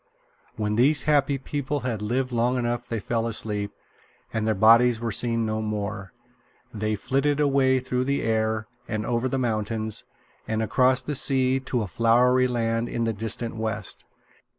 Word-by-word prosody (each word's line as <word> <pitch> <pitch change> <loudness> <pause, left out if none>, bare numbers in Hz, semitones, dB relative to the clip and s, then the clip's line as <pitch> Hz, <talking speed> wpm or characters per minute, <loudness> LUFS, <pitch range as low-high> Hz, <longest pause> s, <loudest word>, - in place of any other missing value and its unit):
When 105 0 -1
these 140 +3 +4
happy 145 -2 +2
people 145 +1 -3
had 120 -4 -3
lived 125 +4 -1
long 120 +2 +1
enough 120 0 -2
they 115 - -2
fell 115 +2 -1
asleep, 105 -2 -1 0.6
and 110 -1 -1
their 110 - +2
bodies 115 +3 +5
were 115 -1 -2
seen 115 +2 0
no 110 0 -2
more. 105 -2 -4 0.6
They 110 0 -1
flitted 135 +7 0
away 135 -2 +3
through 125 0 -2
the 140 +1 0
air, 110 -1 0 0.2
and 110 -1 -3
over 120 +2 0
the 135 - -1
mountains, 110 -2 -1 0.4
and 110 0 -1
across 130 +3 +3
the 150 - -3
sea, 130 -1 +2
to 130 -3 -2
a - - -4
flowery 125 +6 +3
land 115 -1 -1
in 120 - -2
the 115 -1 0
distant 115 +2 -3
west. 110 -3 -4
115 Hz, 165 wpm, -25 LUFS, 110-130 Hz, 0.6 s, bodies